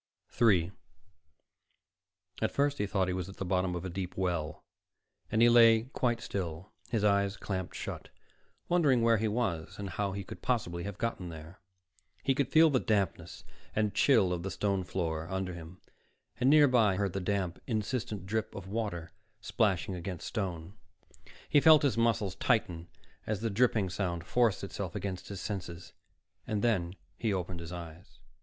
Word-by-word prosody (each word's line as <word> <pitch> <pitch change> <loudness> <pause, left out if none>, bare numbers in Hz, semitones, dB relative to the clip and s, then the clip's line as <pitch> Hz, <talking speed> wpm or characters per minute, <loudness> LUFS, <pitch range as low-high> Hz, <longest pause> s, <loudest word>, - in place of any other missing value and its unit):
3 95 -7 +3 1.7
At - - +2
first 145 0 0
he 105 - 0
thought 95 -2 0
he 90 - -1
was 90 0 -4
at 95 - -11
the 95 - -3
bottom 90 0 0
of 90 +1 -4
a - - -3
deep 90 0 -5
well 85 -5 -2 0.7
and 110 +2 +4
he - - +8
lay 115 -1 +7
quite 120 -2 0
still, 90 -2 -5 0.2
his 110 -4 0
eyes 100 -1 +2
clamped 95 -3 -4
shut, - - -6 0.6
wondering 145 -9 +3
where 115 -1 +5
he 110 - +1
was 105 -8 -2
and 100 -2 -5
how 100 +2 -1
he 100 0 -4
could - - -10
possibly 85 -9 -1
have 100 -2 -5
gotten 105 -6 -3
there. 80 +3 -10 0.6
He 135 - +3
could 140 -1 0
feel 160 +3 +6
the 130 - +3
dampness 95 -7 -1 0.3
and 105 -1 +1
chill 95 -10 +4
of 85 - -3
the 95 - -3
stone 100 -1 -1
floor 85 -3 -3
under 95 -1 -2
him, 85 +1 -10 0.6
and 130 - +4
nearby 130 -9 +5
he - - -3
heard 100 -3 -1
the 95 - -2
damp, 90 -2 -2
insistent 110 -3 -2
drip 110 +2 -2
of 95 -1 -7
water 95 -6 -3 0.3
splashing 100 -5 0
against 90 -1 -5
stone. 90 -5 -4 0.7
He 145 - +4
felt 155 -1 +7
his 140 -6 +2
muscles 115 -5 +1
tighten 90 -8 0 0.4
as 105 -2 -2
the 115 -1 -1
dripping 105 -3 +2
sound 85 -4 -2
forced 120 +1 +2
itself - - -5
against 95 -2 -4
his 100 -3 -6
senses. 90 -4 -6 0.5
Then 100 -5 0 0.2
he 115 - 0
opened 90 -2 -3
his 85 0 -8
eyes. 85 0 -9
100 Hz, 170 wpm, -31 LUFS, 90-115 Hz, 1.7 s, he